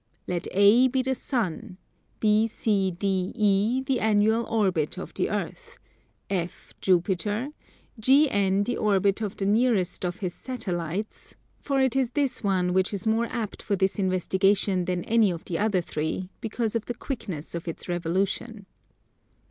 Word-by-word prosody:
Let 175 -2 -3
A 205 +6 +6
be 260 0 0
the 265 +1 0
Sun, 230 - -3 0.4
BCDE 205 +1 +1
the 265 -2 +1
annual 220 +2 +3
orbit 190 -9 0
of - - -7
the - - -1
Earth, - - -5 0.5
F 180 -3 -4
Jupiter, 195 +7 +1 0.5
GN 205 -7 +3
the 245 - -2
orbit 200 0 +2
of 210 -2 -3
the 195 - -2
nearest 210 -4 +2
of 175 -1 -1
his 180 -3 -2
Satellites, 190 -5 -4 0.2
for 275 -1 -1
it 265 -1 +2
is 260 -3 +1
this 285 -3 0
one 185 -3 +1
which 190 +2 +1
is 195 - -4
more 225 +2 +2
apt 225 -3 -4
for 205 - -1
this 190 +1 0
investigation 190 0 +1
than 180 -1 -1
any 225 -2 +3
of 170 -2 -5
the 165 - -3
other 205 -3 +2
three, 160 +4 -3
because 225 0 -2
of 230 - -1
the 240 - -4
quickness 195 - -5
of 170 0 -5
its 165 - -6
revolution. 190 +5 -2
200 Hz, 150 wpm, -26 LUFS, 185-230 Hz, 0.5 s, A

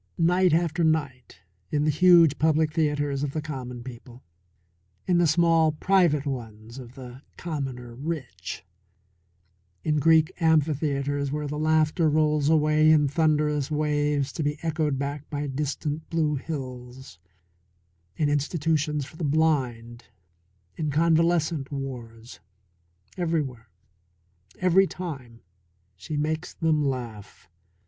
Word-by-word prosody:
Night 180 +2 +3
after 170 +1 +1
night 140 - -1 0.3
in 150 -1 0
the 155 - +2
huge 165 -2 +5
public 155 0 +2
theatres 145 -3 0
of 145 -1 -3
the 155 - -2
common 125 -5 -6
people; 125 0 -11 0.8
in 175 -1 +2
the 175 - +4
small 165 0 +3
private 170 -4 +2
ones 115 -3 -6
of 125 -1 -11
the 125 0 -10 0.2
commoner 135 -7 -5
rich; 145 +1 -6 1.2
in 150 -1 +1
Greek 160 +1 +4
amphitheatres 145 -3 +1
where 150 0 -3
the 150 +1 -4
laughter 155 +1 +2
rolls 150 -1 +2
away 155 0 +4
in 150 -2 +5
thunderous 150 -1 +1
waves 150 -2 0
to - - -5
be 145 0 -1
echoed 155 -3 0
back 140 +1 -5
by 145 -1 -3
distant 145 +2 -3
blue 160 -3 0
hills; 130 - -7 1.0
in 150 - +1
institutions 150 0 0
for 155 - -14
the 170 - -5
blind; 130 -6 0 0.7
in 155 -2 -2
convalescent 165 -1 +1
wards; 120 -4 -7 0.8
everywhere, 145 - -2 0.9
every 185 +1 +4
time, 135 -12 -8 0.5
she 95 - -6
makes 155 +1 -2
them 155 -2 +1
laugh. 120 -9 -5
150 Hz, 120 wpm, -25 LUFS, 135-160 Hz, 1.2 s, huge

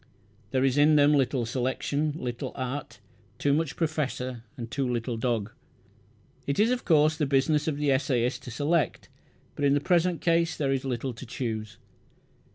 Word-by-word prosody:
There 130 +2 +1
is 135 +1 +2
in 150 +1 +6
them 145 0 +5
little 130 -3 +1
selection, 135 +5 -1
little 125 -5 -4
art 130 +2 -5 0.4
too 140 - +1
much 150 0 0
professor 130 -7 -2
and 115 -2 -7
too 135 -3 -1
little 120 0 -2
dog. 115 -2 -1 1.0
It 140 - 0
is, 220 +3 +4
of 250 0 -1
course, 155 -2 +4
the 155 -3 0
business 145 +3 +2
of 150 -3 0
the 145 -1 +1
essayist 130 -2 +1
to - - -6
select; 150 +6 0 0.5
but 145 - -4
in 140 0 +4
the - - +3
present 175 +2 +2
case 165 -1 +1
there 140 -2 0
is 135 -1 0
little 130 0 -2
to 115 +3 -9
choose. 110 -3 -4
140 Hz, 170 wpm, -27 LUFS, 125-150 Hz, 1.0 s, in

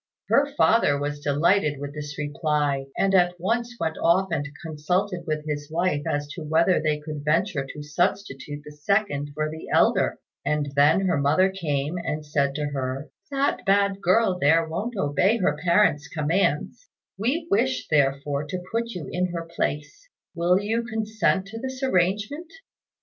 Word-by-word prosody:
Her 280 +1 +4
father 220 -11 +4
was 145 +1 -3
delighted 150 +1 +2
with 145 0 -6
this 150 0 -7
reply, 145 -2 -1
and 195 0 +2
at 180 -1 +3
once 235 +6 -1
went 160 -1 -2
off 185 +3 +3
and 145 -3 -1 0.2
consulted 175 +4 -2
with 155 -1 -2
his 145 -1 -4
wife 165 -2 0
as 145 0 -1
to 165 - -7
whether 160 +4 +2
they 155 -1 0
could 150 -1 -7
venture 155 -2 0
to 150 +2 -8
substitute 150 -3 -2
the 150 - -9
second 150 -2 0
for 155 0 -1
the 160 +1 -8
elder; - - +3 0.3
and 150 -2 -1
then 145 +6 +5
her 180 -5 +1
mother 155 +7 +3
came 155 -3 -2
and 155 -2 -4
said 140 -2 0
to 150 0 -1
her, 135 +1 -4 0.2
"That 275 -2 0
bad 200 -1 +2
girl 185 0 +3
there 165 +2 +4
won't 210 +9 -4
obey 185 +7 +2
her 190 - +1
parent's 170 -5 +3
commands; 165 - -1 0.3
we 275 - -1
wish, 130 - +1
therefore, 140 0 +1
to 180 +4 -5
put 230 +1 -1
you 160 -6 -6
in 180 +1 0
her 165 -1 -4
place: 150 - -3 0.2
will 175 +2 +2
you 220 +3 -1
consent 220 -4 0
to 225 +2 -7
this 260 +1 -6
arrangement?" 210 - 0
165 Hz, 165 wpm, -25 LUFS, 145-195 Hz, 0.3 s, then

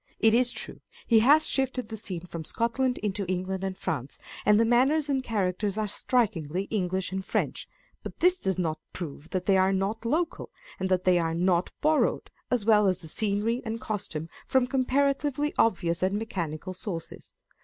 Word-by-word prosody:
It 220 0 +4
is 245 +1 +4
true, - - -4 0.2
he 230 -2 +5
has 290 +7 +6
shifted 260 -3 -1
the 220 - -5
scene 185 -5 -6
from 170 -2 -6
Scotland 245 +7 0
into 205 -1 -1
England 185 +1 -2
and 190 -1 -3
France, 140 -4 -4 0.3
and 210 0 +6
the 230 - +4
manners 270 +6 +3
and 270 -2 +1
characters 200 -2 -1
are 215 -1 0
strikingly 195 - 0
English 190 -3 -1
and 190 0 -3
French; - - -2 0.3
but - - -9
this 360 +1 +4
does 190 -1 0
not 160 -4 -1
prove 160 -2 -7
that 185 -1 -2
they 195 -1 +4
are 190 0 +4
not 195 +4 -1
local, 310 +8 -1 0.3
and 190 0 -1
that 185 -1 +2
they 180 -1 +4
are 165 -1 -1
not 180 0 +1
borrowed, 310 0 +1 0.2
as 245 -5 0
well 210 -2 +5
as 185 -1 +1
the 165 - -9
scenery 215 +7 0
and 225 0 -4
costume, 165 -8 -4 0.2
from 260 -2 +3
com 260 0 0
paratively 280 +2 +1
obvious 175 -5 +2
and 190 +2 +1
mechanical 185 -6 -4
sources. 180 -3 -7
205 Hz, 185 wpm, -27 LUFS, 185-245 Hz, 0.3 s, has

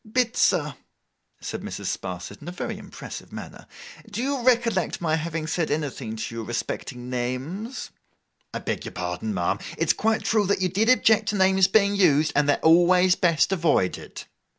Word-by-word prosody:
'Bitzer,' 215 - +1 0.7
said - - -5
Mrs. - - -6
Sparsit, 90 +2 -7
in 150 - -11
a - - -4
very 180 - -5
impressive - - -9
manner, - - -9 0.4
'do 220 +3 -3
you 275 -1 -1
recollect 230 -7 +2
my 160 -2 +1
having 160 0 -3
said 165 0 -1
anything 135 -7 -3
to 115 +1 -5
you 115 - -4
respecting 120 +2 -5
names?' 130 - -4 0.6
'I - - -4
beg - - -3
your - - -7
pardon, 90 +4 -3
ma'am. 90 -4 -1 0.2
It's - - +2
quite 220 0 0
true 210 -3 +2
that 200 - +1
you 185 -1 +1
did 210 +6 +1
object 220 -4 +4
to 210 - -1
names 190 -1 +4
being 200 0 +3
used, 155 -6 +4
and 145 0 +3
they're 145 - +4
always 180 +2 +6
best 170 0 +2
avoided. 165 - 0
175 Hz, 170 wpm, -25 LUFS, 140-205 Hz, 0.7 s, always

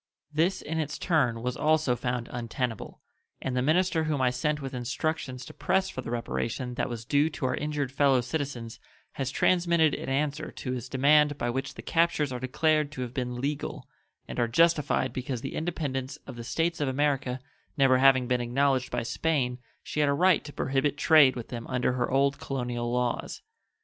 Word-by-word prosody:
This, 170 +5 +1
in 160 +1 -3
its 150 -2 -2
turn, 125 -10 +1
was 125 0 -1
also 155 -4 +2
found 125 -1 -3
untenable, 120 -1 -4 0.4
and 130 - -3
the 125 - +2
minister 160 +3 +2
whom 150 -3 0
I 130 -1 +3
sent 150 +4 -1
with 135 -1 -6
instructions 130 +1 -3
to - - -10
press 190 0 +1
for 130 - -5
the 120 - -7
reparation 120 +1 -3
that - - -2
was 115 -2 -6
due 145 +4 +3
to 150 - -4
our 130 - +1
injured 150 -3 -2
fellow 135 -2 +3
citizens 125 -3 -4 0.3
has 135 -2 -3
transmitted 170 0 +3
an - - -4
answer 145 +2 -1
to 125 - -5
his 125 -1 -4
demand 145 +2 +4
by 120 -3 -1
which 135 +3 -4
the - - -9
captures 165 -4 +1
are 125 - -3
declared 150 +3 +1
to 130 - -5
have 120 -1 -7
been 125 -2 -3
legal, 140 +2 -3 0.4
and - - -5
are 120 - +2
justified 150 -1 +2
because 125 -2 -3
the - - -5
independence 145 -5 -3
of 130 - -8
the 120 - -7
States 165 +6 -1
of 145 - +1
America 135 -2 0 0.4
never 130 -2 +5
having 130 -1 +5
been 125 -1 +1
acknowledged 130 +2 +1
by 120 -1 -2
Spain 125 -2 0 0.2
she - - -4
had 145 -1 +3
a - - +3
right 180 +4 +4
to 145 - -9
prohibit 140 +1 0
trade 150 -4 +6
with 120 -2 -7
them 120 -2 -6
under 125 -1 0
her 125 -1 -1
old 140 +1 +2
colonial 120 -3 -3
laws. 125 0 -2
135 Hz, 195 wpm, -28 LUFS, 125-150 Hz, 0.4 s, trade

